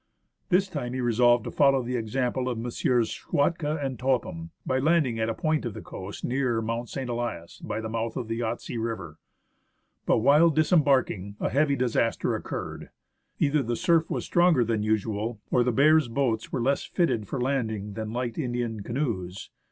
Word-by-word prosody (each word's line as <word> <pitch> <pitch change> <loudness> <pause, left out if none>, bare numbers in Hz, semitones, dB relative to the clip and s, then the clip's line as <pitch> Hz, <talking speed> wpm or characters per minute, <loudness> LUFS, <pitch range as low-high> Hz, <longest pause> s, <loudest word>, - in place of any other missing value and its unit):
This 190 +1 +3
time 145 -9 -4
he 130 - -3
resolved 120 -1 +3
to - - -5
follow 135 -2 +4
the 125 +1 -3
example 125 +2 -1
of 120 - -2
Messrs. 120 0 0
Schwatka 150 +5 0
and 130 -4 -4
Topham, 115 -11 -1 0.2
by 130 - +1
landing 145 -5 +2
at 110 0 0
a 115 - -2
point 155 -1 0
of 120 -4 -4
the - - -7
coast 95 +2 -7
nearer 125 -2 0
Mount 115 +1 -3
St. 135 -2 -4
Elias 120 -8 -4
by - - -4
the 110 - -4
mouth 115 0 -3
of 120 - -3
the 115 +1 -3
Yahtse 115 0 -3
River. 115 -1 -5 0.9
But - - +4
while 145 +8 +5
disembarking, 140 - +2
a - - 0
heavy 140 +2 +2
disaster 120 -3 0
occurred. - - -6 0.5
Either 150 0 +2
the 120 -1 -2
surf 170 -1 +2
was - - -2
stronger 175 -7 +4
than 110 -1 0
usual, 110 +1 -1
or 125 - +4
the 125 - +1
Bears 150 +4 +5
boats 115 -2 -1
were 125 - -1
less 140 +3 +1
fitted 125 - 0
for 135 - -3
landing 110 -6 -1
than 110 0 -5
light 120 +1 -3
Indian 120 -5 -2
canoes. 100 -7 -3
120 Hz, 180 wpm, -27 LUFS, 115-140 Hz, 0.9 s, while